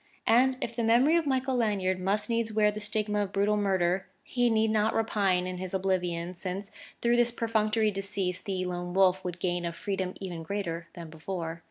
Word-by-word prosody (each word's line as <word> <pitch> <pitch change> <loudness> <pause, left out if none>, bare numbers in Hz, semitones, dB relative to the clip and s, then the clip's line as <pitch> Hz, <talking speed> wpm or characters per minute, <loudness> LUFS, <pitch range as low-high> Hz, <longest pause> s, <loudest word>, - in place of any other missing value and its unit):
And 255 +3 +4
if 235 - -3
the 235 - -1
memory 245 +8 +4
of 335 -3 +1
Michael 265 -1 +1
Lanyard 200 -6 +1
must 200 +3 +1
needs 230 -1 0
wear 210 -1 +3
the 210 - -6
stigma 210 0 0
of 200 -2 -2
brutal 200 +2 +2
murder, 190 -2 +1 0.2
he 245 -1 +1
need 220 -1 +2
not 215 0 +2
repine 200 -5 +1
in 180 0 -4
his 185 0 -3
oblivion, 180 -2 -1
since 190 +3 -5 0.3
through 240 0 +3
this 240 0 +4
perfunctory 220 -2 +1
decease 195 -2 -2
the 185 -2 -3
Lone 175 0 -4
Wolf 190 -1 +4
would 180 -1 -4
gain 175 -1 -1
a 170 - -2
freedom 190 0 -3
even 180 -4 -5
greater 170 -2 -4
than 170 -2 -9
before. 165 0 -5
195 Hz, 195 wpm, -29 LUFS, 180-220 Hz, 0.3 s, And